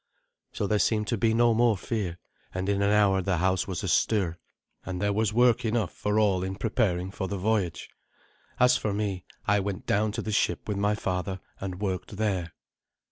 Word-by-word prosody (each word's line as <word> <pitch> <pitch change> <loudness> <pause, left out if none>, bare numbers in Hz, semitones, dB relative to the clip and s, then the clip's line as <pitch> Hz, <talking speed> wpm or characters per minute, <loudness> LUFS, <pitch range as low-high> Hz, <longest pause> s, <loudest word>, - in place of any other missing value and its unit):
So - - -2
there 105 +1 +1
seemed 105 0 +2
to 120 - 0
be 115 +1 +3
no 115 +1 +4
more 115 -2 +3
fear, 95 -5 -3 0.4
and 95 +1 -2
in 100 0 +1
an 100 - +3
hour 100 -2 +4
the 90 -1 0
house 95 +2 +1
was 95 -4 -4
astir, 90 -6 +1 0.4
and 90 -1 -4
there 100 +1 +1
was 110 0 +1
work 120 +2 +4
enough 110 -4 0
for 105 +1 -1
all 100 -4 +3
in 95 0 -3
preparing 95 -4 0
for 95 -1 -4
the 100 - -3
voyage. 100 -3 -1 0.7
As 125 0 +5
for 105 -2 -2
me, 100 -3 -2 0.2
I 105 -1 +3
went 100 -1 -4
down 105 +1 +1
to 115 - -3
the 110 - -3
ship 105 - 0
with 105 -2 -2
my 105 +1 +1
father, 95 -1 -2 0.2
and 95 -2 -5
worked 95 0 -3
there. 95 -6 -1
100 Hz, 195 wpm, -27 LUFS, 95-110 Hz, 0.7 s, As